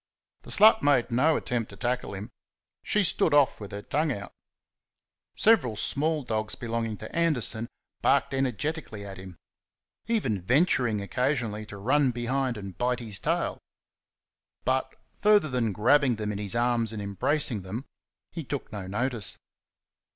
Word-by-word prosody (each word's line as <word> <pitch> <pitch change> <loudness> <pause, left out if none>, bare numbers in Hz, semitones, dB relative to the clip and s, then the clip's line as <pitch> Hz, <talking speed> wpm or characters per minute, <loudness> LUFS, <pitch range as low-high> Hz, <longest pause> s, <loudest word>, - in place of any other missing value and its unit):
The - - -14
slut 220 +1 +6
made 130 -4 +3
no 150 +7 +3
attempt 120 -3 -2
to 100 - -11
tackle 120 0 -2
him; 100 +3 -7 0.5
she 210 - +2
stood 160 -3 +2
off 145 -2 +4
with 105 -2 -8
her 100 0 -6
tongue 155 +2 0
out. 100 -5 -6 1.0
Several 205 - +4
small 150 +7 0
dogs 110 -3 -2
belonging 115 -2 -3
to 110 - -9
Anderson 125 -9 +1 0.3
barked - - +2
energetically 135 - -2
at 95 -1 -8
him, 95 -2 -11 0.7
even 165 - 0
venturing 125 - +2
occasionally 115 -1 -1
to 105 - -9
run 130 +7 +2
behind 125 +1 -1
and 100 -3 -8
bite 125 0 +1
his 110 -5 -4
tail. - - -1 1.1
But, 130 +1 +1 0.3
further 205 -6 +4
than 120 -4 0
grabbing 125 +5 +3
them 105 -1 -3
in 100 - -4
his 105 +1 -3
arms 120 -2 +1
and 110 - -5
embracing 105 +4 0
them, 105 +8 -6 0.5
he 165 - -5
took 140 0 -5
no 100 -3 -6
notice. 115 +1 -2
120 Hz, 150 wpm, -27 LUFS, 105-140 Hz, 1.1 s, slut